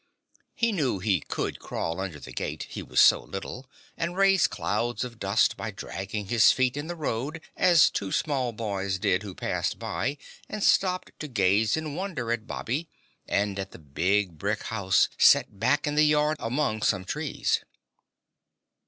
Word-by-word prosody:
He 235 -1 +1
knew 145 - 0
he 95 -1 +1
could - - -4
crawl 85 +2 -4
under 95 -6 -4
the 65 - -10
gate, 65 - -4
he - - -5
was - - -1
so - - +7
little, 125 +7 -7 0.3
and 170 +2 -3
raise 195 -2 +5
clouds 120 +5 -2
of 120 -2 -8
dust 100 +3 +2
by - - -5
dragging 100 +2 -5
his 115 +3 +5
feet 130 -1 +1
in 145 +2 -4
the 175 - -4
road 150 0 -3 0.2
as 175 -4 +5
two 95 -1 -3
small 135 -6 0
boys 100 -4 -2
did 95 0 +1
who 100 -3 -8
passed - - -2
by 145 - -2 0.3
and 210 -1 -4
stopped 185 -1 +2
to 155 - -5
gaze 105 0 +2
in 155 -2 -4
wonder 160 -10 -3
at 115 -2 -2
Bobby 150 +8 -3 0.4
and 100 -1 0
at 95 0 -5
the - - -10
big 85 +4 -1
brick 105 +1 -1
house 100 -4 +2
set 100 - +5
back 145 +7 +2
in 150 - -1
the 150 +1 +4
yard 150 0 +3
among 115 -2 -1
some 95 -3 +1
trees. - - -1
115 Hz, 170 wpm, -27 LUFS, 100-150 Hz, 0.4 s, so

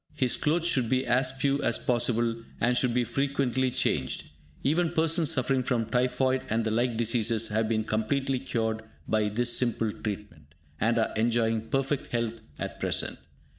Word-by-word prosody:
His 130 -5 +1
clothes 165 +3 0
should 130 -9 +1
be 130 +1 +1
as 130 +2 +3
few 140 +1 0
as 120 - +2
possible, 120 -1 0 0.2
and 125 +1 +2
should 125 0 +2
be 125 +1 +2
frequently 130 0 0
changed. 120 - -1 0.3
Even 165 +4 +1
persons 165 -1 +2
suffering 130 0 +2
from 120 -3 0
typhoid 130 +2 +1
and 115 +1 +1
the 110 - 0
like 120 +1 +1
diseases 115 -1 +1
have 110 +1 0
been 110 -1 +1
completely 130 +5 0
cured 110 -4 -2 0.3
by 110 -1 +1
this 120 +3 +1
simple 115 -3 +1
treatment, 95 -9 -7 0.2
and 115 +3 +2
are 110 - +1
enjoying 115 0 +1
perfect 135 0 -1
health 115 -1 -1 0.2
at - - -5
present. - - -2
120 Hz, 165 wpm, -28 LUFS, 110-130 Hz, 0.3 s, as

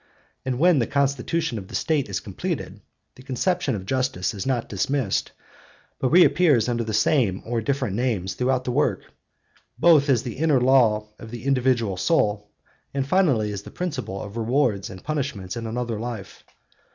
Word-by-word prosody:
And 130 -2 -1
when 170 +1 +4
the 115 - 0
constitution 140 -1 0
of 95 - -10
the - - -8
State 150 -7 0
is 95 - -2
completed, - - -5 0.3
the - - -15
conception 140 +3 -1
of 95 -2 -6
justice 125 -5 -1
is 100 +4 -5
not 125 -3 0
dismissed, 110 +2 -1 0.7
but 130 - +1
reappears 155 -7 +5
under 120 -1 0
the 110 - -4
same 105 -2 +2
or 115 0 -1
different 130 -4 -1
names 105 -7 -1
throughout 130 +3 0
the 125 - -2
work, - - +1 0.7
both 155 0 +5
as 125 -4 +3
the 120 - -6
inner 155 -4 +3
law 120 -5 +3
of 115 - -10
the 120 +1 -8
individual 125 -7 +1
soul, 105 - +1 0.5
and 135 -1 0
finally 135 - +2
as 100 - -5
the - - -11
principle 150 - -4
of 105 +2 -8
rewards 115 -3 0
and 95 -2 -10
punishments 130 -10 -3
in 115 -1 -4
another 115 -1 -3
life. 110 -4 -7
125 Hz, 170 wpm, -24 LUFS, 105-140 Hz, 0.7 s, reappears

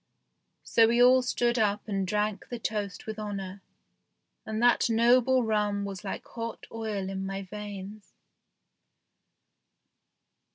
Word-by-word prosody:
So 225 -1 +4
we 235 +1 +2
all 255 +1 +7
stood 240 -1 0
up 210 -1 0
and 195 -2 -1
drank 210 0 -1
the 245 - -4
toast 210 -3 -4
with 220 -1 -6
honour, 200 -2 -5 0.9
and 220 0 -2
that 240 0 +4
noble 245 +3 +4
rum 210 -2 0
was 195 -1 -6
like 195 - -5
hot 230 -1 -6
oil 215 -4 -3
in 190 0 -4
my 195 0 -4
veins. 205 +1 -8
210 Hz, 125 wpm, -28 LUFS, 200-230 Hz, 0.9 s, all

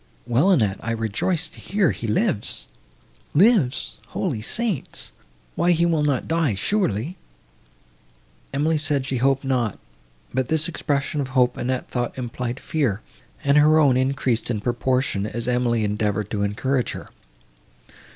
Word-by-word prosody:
"Well, 125 +10 +3
Annette, 110 - +3
I 115 - -2
rejoice 115 - -1
to - - -14
hear 200 -3 +1
he 115 - -5
lives." 105 -1 0 0.7
"Lives! 185 - +3
Holy 140 - -2
Saints! 210 - -1 0.4
why 175 +1 +3
he 170 +1 +2
will 165 -3 +2
not 145 -4 0
die, 160 -9 +1
surely!" 165 - 0 1.3
Emily 150 +3 +1
said 145 -3 +1
she 135 -1 -1
hoped 135 +2 +2
not, 125 -6 0 0.6
but 130 -1 0
this 160 +2 +1
expression 145 -3 -1
of 135 - -3
hope 125 -1 +4
Annette 130 +1 -2
thought 120 0 -3
implied 125 0 -4
fear, 130 - -1 0.4
and 140 +1 +4
her 155 +1 +6
own 140 -5 +5
increased 130 -3 0
in 110 -3 0
proportion, 120 -2 0
as 115 +2 -4
Emily 120 -2 +1
endeavoured 105 -1 -1
to 105 - -1
encourage 125 +6 0
her. - - -8
130 Hz, 140 wpm, -23 LUFS, 115-155 Hz, 1.3 s, her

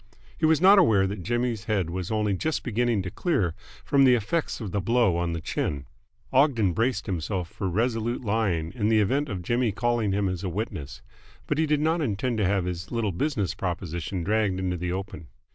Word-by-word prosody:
He 160 - +1
was 160 -1 +4
not 195 +3 +7
aware 110 - +4
that 100 0 -4
Jimmy's 120 +1 -1
head 100 -7 0
was 90 +1 -4
only 105 -2 0
just 155 - -1
beginning 120 -3 0
to 90 - -5
clear 100 - 0 0.3
from 140 -1 +4
the 130 -2 +6
effects 135 +9 -1
of 105 -6 -5
the 100 - -1
blow 115 -2 +2
on 85 0 -1
the 85 - -3
chin. 70 -2 -2 0.5
Ogden 125 - +3
braced 115 +3 0
himself 90 -1 -2
for 95 -3 -3
resolute 115 +4 -1
lying 100 -7 0
in 105 -3 0
the 110 -1 +4
event 135 +8 +1
of 95 -4 -4
Jimmy 120 +3 +1
calling 115 0 0
him 100 0 +1
as 90 -1 -3
a 95 - -1
witness. 90 -6 -5 0.4
But 150 - -1
he 160 - +2
did 150 -1 +2
not 160 +2 +1
intend 120 -2 -1
to 100 - +2
have 95 -2 +1
his 90 0 -4
little 115 -4 0
business 105 - -1
proposition 85 0 -4
dragged 105 -1 +1
into 90 -1 -1
the 90 +1 -3
open. 95 -3 -5
105 Hz, 205 wpm, -26 LUFS, 90-120 Hz, 0.5 s, not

